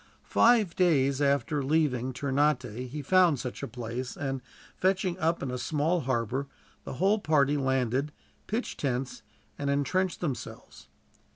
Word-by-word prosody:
Five 225 -7 +4
days 140 -6 +2
after 140 +1 +1
leaving 135 -4 +1
Ternate 130 -3 0
he 145 +3 -6
found 175 -2 +4
such 125 -1 -5
a - - -3
place 120 +2 -5
and, 135 -2 -3 0.3
fetching 185 -1 +1
up 165 -1 0
in 130 - -3
a 125 - -3
small 155 +6 0
harbor, 130 0 -1 0.4
the - - -5
whole 195 +9 +2
party 150 -5 +2
landed, 130 0 0 0.4
pitched 225 +4 -3
tents, 130 -2 -2 0.4
and 140 - -1
entrenched 175 +7 0
themselves. 135 -9 -6
140 Hz, 135 wpm, -28 LUFS, 130-165 Hz, 0.4 s, Five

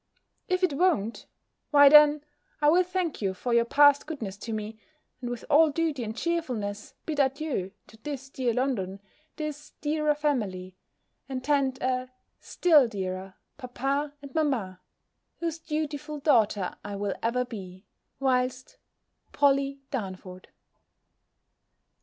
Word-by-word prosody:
If 365 0 0
it 360 -5 +3
won't, 280 - 0 0.4
why 285 -1 +7
then, 300 0 +7 0.4
I 295 -1 +4
will 355 +3 +5
thank 360 -5 -2
you 190 -2 -1
for 240 +5 -2
your 235 0 +4
past 285 +3 +5
goodness 230 -12 -5
to 225 - -7
me, 215 0 -5 0.4
and 245 - -4
with 245 -1 -6
all 315 +1 +6
duty 300 -4 -1
and 220 +1 -6
cheerfulness, 240 -12 -3
bid 305 -2 -3
adieu 275 -7 0 0.2
to 220 - -17
this 275 +3 -6
dear 255 -3 0
London, 220 -7 -1 0.4
this 300 -1 -6
dearer 305 0 +1
family, 205 -12 -2 0.5
and 255 -1 -4
tend 275 -2 +1
a 255 0 -1 0.3
still 305 -8 +4
dearer 190 -2 -5 0.2
papa 275 +3 -2
and 275 -2 -10
mamma; 235 - -1 0.6
whose 330 -1 -3
dutiful 300 -1 -4
daughter 225 - +2
I 205 -1 -5
will 200 -1 -2
ever 250 +2 0
be, 190 -5 -9 0.3
whilst 255 -1 0 0.6
POLLY 275 -1 +2
DARNFORD. 185 -6 -6
265 Hz, 130 wpm, -27 LUFS, 215-295 Hz, 0.6 s, why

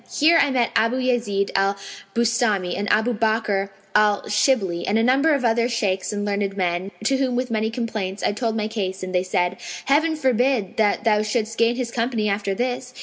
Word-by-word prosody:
Here 330 +3 +4
I 285 - +2
met 250 -3 +1
Abu 230 +3 +2
Yazνd 235 -6 0
al 195 +1 +1 0.4
Bustαmi 230 -6 +1
and 200 +2 -2
Abu 220 +3 +2
Bakr 215 -3 0 0.2
al 210 -1 +3
Shibli 210 -5 +1
and 210 - +2
a 225 - +2
number 275 +6 +3
of 265 -3 -2
other 230 +1 +2
Shaykhs 200 -6 -1
and 205 -1 -3
learned 200 -1 -2
men, 180 0 -1
to 270 +5 +2
whom 260 -2 0
with 250 0 -2
many 220 0 0
complaints, 220 -5 -4
I - - +2
told 225 +1 -2
my 215 -1 -1
case 195 -4 -4
and 185 0 -5
they 180 - +2
said, 180 0 -1 0.3
'Heaven 315 +4 +2
forbid 255 -6 0
that 210 -1 +1
thou 210 -2 +3
shouldst 215 +1 -2
gain 230 +1 +3
his 245 -2 -3
company 230 -2 -1
after 200 -1 -1
this! 250 +1 -3
220 Hz, 200 wpm, -22 LUFS, 200-245 Hz, 0.4 s, Here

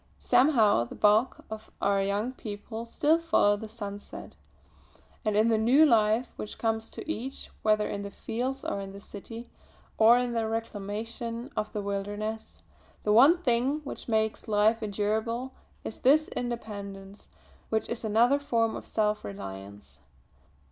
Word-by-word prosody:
Somehow, 225 - +4
the - - -10
bulk 215 +4 +3
of 220 0 -7
our 200 0 +2
young 200 +5 -1
people 220 -1 -7
still 300 +7 +2
follow 325 -11 +3
the 220 +2 -7
sunset; 205 -2 -8 0.9
and 215 -1 +1
in 220 +2 +4
the 220 -1 +3
new 260 +8 +6
life 225 -2 +3
which 215 - -6
comes 225 -1 -1
to - - -9
each, 270 -3 -5
whether 215 -1 +2
in 200 - -4
the 200 - -5
fields 255 +6 -4
or - - -2
in 195 0 -8
the 200 - -9
city 225 +4 -10 0.5
or 225 +2 +7
in 245 -1 -1
the 225 -1 0
reclamation 225 +3 -4
of 215 - -2
the 210 - -4
wilderness, 205 +2 -4 0.4
the 210 - +2
one 300 +10 +6
thing 255 +3 +2
which 280 - -7
makes 220 -1 0
life 215 +2 +3
endurable 220 +4 -2 0.3
is - - -6
this 300 +4 +4
independence 200 -5 -6 0.4
which 220 0 0
is 235 - -4
another 235 +6 +3
form 230 -5 0
of - - -8
self 210 -1 0
reliance. 95 -7 -9
220 Hz, 150 wpm, -28 LUFS, 205-240 Hz, 0.9 s, or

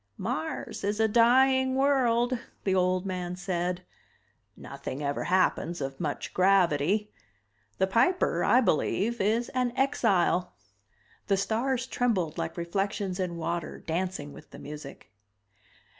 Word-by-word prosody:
"Mars 155 +5 -4
is 205 +2 -1
a 220 - +4
dying 260 +3 +4
world," 255 -3 +2 0.2
the 190 - +1
old 185 0 +1
man 180 -2 -3
said. 180 -1 -3 0.7
"Nothing 135 +3 -7
ever 140 0 -2
happens 175 -2 +1
of 135 -1 -5
much 150 -4 -4
gravity. 190 +1 +2 0.7
The 190 - +3
Piper, 235 - +2
I 250 - +5
believe, 220 - 0
is 225 +4 +1
an 250 -1 0
exile." 195 -9 +2 0.7
The 195 - +2
stars 240 +6 0
trembled 195 -12 -1
like - - -4
reflections 195 +2 -2
in 175 -2 -2
water, 170 0 -3
dancing 165 -4 -3
with - - -14
the - - -12
music. 150 -1 -10
190 Hz, 125 wpm, -28 LUFS, 175-235 Hz, 0.7 s, I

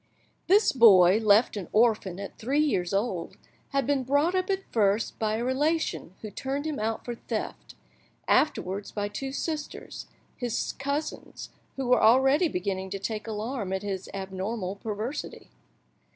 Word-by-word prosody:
This 400 +4 +5
boy, 200 -6 +7
left 215 +2 +4
an 195 -5 -5
orphan 215 -5 +2
at 200 - -8
three 265 +6 -1
years 230 -13 +1
old, 195 -4 -2 0.3
had 275 -2 0
been 280 0 +1
brought 285 +7 +2
up 370 0 0
at 385 0 0
first 210 -1 +1
by 215 -1 0
a 230 - -2
relation 280 - -1
who 215 - -6
turned 275 +7 -3
him 310 -5 -3
out 220 +1 -2
for 240 - -3
theft; 235 - -5 0.5
afterwards 200 -9 +1
by 205 -1 -2
two 270 +6 -5
sisters, 300 +1 -5 0.3
his 245 -3 -2
cousins, 285 +3 -4 0.2
who 270 - -3
were 250 -1 +4
already 270 +8 +5
beginning 190 - -3
to 195 - -3
take 215 +3 -4
alarm 215 -1 -3
at 190 +1 -2
his 195 -2 -4
abnormal 195 +1 -4
perversity. 220 +7 -5
225 Hz, 150 wpm, -27 LUFS, 200-275 Hz, 0.5 s, boy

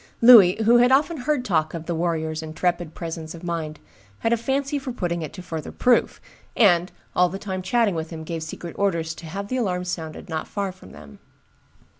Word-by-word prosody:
Louis, 225 -7 +9
who 235 +2 +6
had 245 +1 +5
often 295 +5 +3
heard 265 0 -1
talk 160 -4 0
of 165 -1 -6
the 175 - -2
warrior's 160 -2 -1
intrepid 170 +1 -2
presence 165 -1 -6
of 165 - -12
mind, 165 -3 -4 0.4
had 225 - +2
a - - +5
fancy 275 +4 -1
for 265 -1 -5
putting 175 -7 -2
it 155 - -5
to 180 - -9
further 160 -4 -6
proof, 250 -1 +2 0.4
and, 180 -5 +4 0.2
all 180 0 +4
the 190 - -5
time 190 -2 -4
chatting 210 +2 +1
with 160 -1 -4
him, 160 -2 -7
gave 165 0 -5
secret 160 +1 -7
orders 170 -5 0
to 165 - -11
have 200 +5 -5
the 255 - -2
alarm 185 -7 -1
sounded 160 -3 -6
not 160 -2 -4
far 200 -2 -3
from 185 - -16
them. 70 -1 -13
175 Hz, 205 wpm, -23 LUFS, 160-225 Hz, 0.4 s, Louis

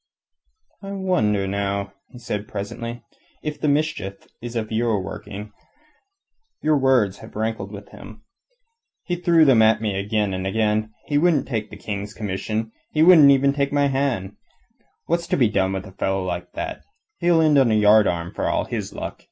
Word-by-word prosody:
"I 195 0 -6
wonder, 110 - +1
now," 100 0 -2 0.2
he - - -13
said 105 -3 -4
presently, 115 +4 -6 0.4
"if 150 -1 -5
the - - +1
mischief 145 -10 -1
is 120 0 -7
of 110 -1 -3
your 110 -2 +1
working. 105 +2 -8 1.1
Your 155 0 +2
words 130 -8 +2
have - - -13
rankled 110 -2 -3
with 100 -1 -10
him. 110 +2 -13 0.8
He 175 - -2
threw 170 -2 +4
them 130 -5 +5
at 110 0 +4
me 105 -3 -2
again 105 0 -1
and 95 +1 -3
again. 110 +1 0
He 145 -1 +1
wouldn't 165 -3 +2
take 110 -5 -3
the 105 - -10
King's 100 0 -5
commission; 110 +2 -3 0.2
he 155 - +3
wouldn't 140 -5 +7
take 140 -1 0
my 145 0 +2
hand 135 -7 0
even. 95 - -13 0.7
What's 170 0 -1
to - - 0
be 120 -6 +4
done 95 -2 +1
with 95 0 -4
a 95 - -11
fellow 95 0 -1
like 90 -1 -5
that? - - -5 0.4
He'll 170 -1 +3
end 155 -3 +5
on 130 -3 +4
a 110 - +3
yardarm 105 -5 +3
for - - -2
all - - 0
his - - -5
luck. - - -6
110 Hz, 175 wpm, -22 LUFS, 100-140 Hz, 1.1 s, wouldn't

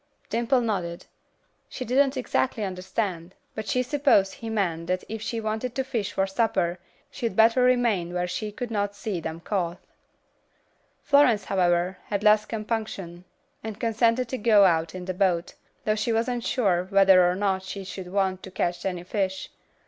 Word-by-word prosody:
Dimple 240 +2 +2
nodded. 185 -7 -3 0.6
She 255 - -6
didn't 270 +2 +2
exactly 250 -2 -1
understand, 185 -2 -3 0.2
but 220 -1 -6
she 250 - +1
supposed 260 -8 +3
he 225 - -7
meant 175 -6 -1
that 185 0 -1
if 220 0 -6
she 230 +1 -3
wanted 220 +3 -3
the 265 - 0
fish 230 -6 -3
for 195 - +1
supper, 190 -4 0 0.3
she'd 230 -7 -3
better 230 +3 +5
remain 240 -8 +2
where 180 0 -1
she 210 +4 -4
could 240 +2 -6
not 205 -1 -1
see 205 -3 -3
them 160 +1 -6
caught. 175 -3 -2 1.3
Florence, 250 -8 +4
however, 180 -1 +1
had 200 -1 -3
less 210 0 +5
compunction, 215 -6 -4 0.4
and 220 -1 -6
consented 230 +2 +1
to 260 - -3
go 210 -2 +6
out 165 -1 +1
in 180 -1 -6
the 185 - -3
boat, 180 -2 0 0.3
though 215 - +3
she 215 +2 -1
wasn't 235 +1 0
sure 190 -9 +1
whether 195 -2 +6
or 180 - 0
not 190 -1 0
she 190 +1 -7
should 185 -1 -8
want 190 -1 0
to - - -9
catch 175 -1 -2
any 180 -2 -4
fish. 190 0 -3
205 Hz, 170 wpm, -26 LUFS, 185-230 Hz, 1.3 s, go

